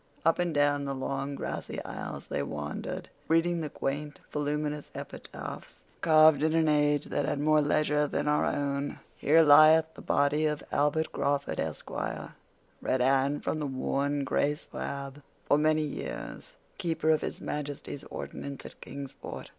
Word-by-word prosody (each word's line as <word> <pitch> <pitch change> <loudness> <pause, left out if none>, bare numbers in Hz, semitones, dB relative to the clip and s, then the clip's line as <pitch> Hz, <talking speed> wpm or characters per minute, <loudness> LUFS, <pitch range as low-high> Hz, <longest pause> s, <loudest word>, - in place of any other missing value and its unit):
Up 165 +1 +4
and 175 -1 +1
down 145 -1 +2
the 140 0 -2
long 135 +1 -3
grassy - - -4
aisles - - -6
they - - -2
wandered, 75 +1 -4 0.2
reading 165 +1 +2
the 155 - -3
quaint, 145 +2 -3
voluminous 150 0 -2
epitaphs, - - -8 0.2
carved 155 -2 +6
in 160 +1 +2
an 160 -1 +3
age 145 -1 +3
that - - -1
had 145 - -1
more 155 +1 +4
leisure 150 0 +2
than 145 - -2
our 150 0 +3
own. 140 0 -1 0.2
"'Here 160 +3 +5
lieth 155 +2 +7
the - - -11
body 145 +2 +2
of 150 -1 -2
Albert 150 +2 +1
Crawford, 140 0 -1
Esq.,'" 80 -1 -4 0.9
read 130 - +1
Anne 135 +3 +2
from 155 - -2
a 145 - -1
worn, 140 +2 -1
gray 145 +2 +1
slab, 140 -1 -6 0.2
"'for 145 - +4
many 155 0 +3
years 155 - -6 0.2
Keeper 160 -4 +1
of 155 - +3
His - - -4
Majesty's 145 -1 -5
Ordnance 140 -1 -7
at - - -11
Kingsport. 140 -1 -8
145 Hz, 155 wpm, -29 LUFS, 140-155 Hz, 0.9 s, lieth